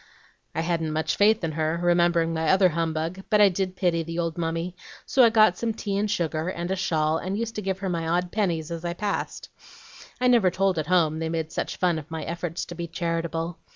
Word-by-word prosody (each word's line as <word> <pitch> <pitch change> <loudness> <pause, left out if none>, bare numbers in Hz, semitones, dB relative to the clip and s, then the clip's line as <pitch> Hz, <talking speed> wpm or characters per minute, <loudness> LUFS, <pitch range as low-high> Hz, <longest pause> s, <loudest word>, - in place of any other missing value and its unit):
I - - 0
hadn't 165 -2 -1
much 155 0 0
faith 215 0 +4
in 165 - -1
her, 160 +2 -1
remembering 175 -1 +2
my 160 -1 0
other 190 -1 +5
humbug, 165 +2 -2
but 210 - +4
I 205 -1 +7
did 185 0 -2
pity 175 -3 +1
the 165 +1 -5
old 165 -2 -1
mummy; 165 +1 -3 0.3
so 260 - +4
I 235 - +7
got 215 -5 +4
some 225 -2 -1
tea 200 -3 -3
and 205 +1 0
sugar, 160 -2 -1
and 175 0 -4
a - - +1
shawl, 160 -4 0
and 190 +3 -3
used 230 0 -3
to - - -2
give 190 -1 -2
her 195 0 -4
my 165 -3 -2
odd 175 +1 0
pennies 170 -6 -1
as 165 0 -5
I 170 0 -2
passed. 205 +2 -3 0.7
I 250 - 0
never 235 -7 +5
told 190 -1 +1
at 155 - -3
home, 160 -3 +2
they 160 0 -2
made 160 -1 -3
such - - -3
fun 175 -4 +1
of 155 - -12
my 160 -1 -4
efforts 170 0 -4
to - - -8
be 170 0 -5
charitable. 165 0 -3
170 Hz, 230 wpm, -25 LUFS, 165-190 Hz, 0.7 s, I